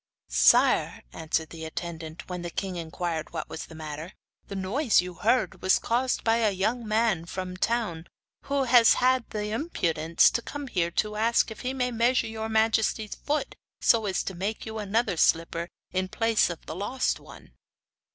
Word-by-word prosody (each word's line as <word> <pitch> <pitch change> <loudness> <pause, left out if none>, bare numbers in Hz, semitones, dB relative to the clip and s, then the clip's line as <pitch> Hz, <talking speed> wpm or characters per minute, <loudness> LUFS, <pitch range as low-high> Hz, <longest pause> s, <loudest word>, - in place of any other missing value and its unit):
'Sire,' - - +4
answered 160 0 -2
the 165 -1 -8
attendant, 160 0 -6
when 180 -1 -5
the 175 - -4
king 190 +1 -4
inquired 165 -1 -4
what - - -4
was 160 - -7
the 160 - -12
matter, 155 +2 -7 0.3
'the 200 - -6
noise 215 +7 +2
you 180 0 -2
heard 230 +8 0
was 185 - +4
caused 250 +2 0
by 225 0 +3
a 225 -2 +3
young 220 +5 -1
man 215 -5 +1
from 185 +1 -5
the 185 - -11
town, 210 -9 -1 0.4
who 280 -1 0
has 240 -2 +6
had 255 0 +3
the 210 0 -3
impudence 170 - +2
to 235 - -1
come 290 +4 -6
here 180 -9 0
to 210 +5 -1
ask 230 +1 +2
if 220 - -9
he 255 - -2
may 250 -2 -1
measure 240 +2 +2
your 220 0 -4
majesty's 220 -1 +1
foot, 300 +1 -2 0.3
so 225 -3 +3
as 190 -2 0
to 195 - -4
make 195 +5 -4
you 220 0 -5
another 210 0 0
slipper 165 +1 +1 0.2
in 185 0 -1
place 225 +1 +2
of 170 - -7
the - - -6
lost 245 +8 -1
one. - - -15
210 Hz, 180 wpm, -27 LUFS, 170-230 Hz, 0.4 s, has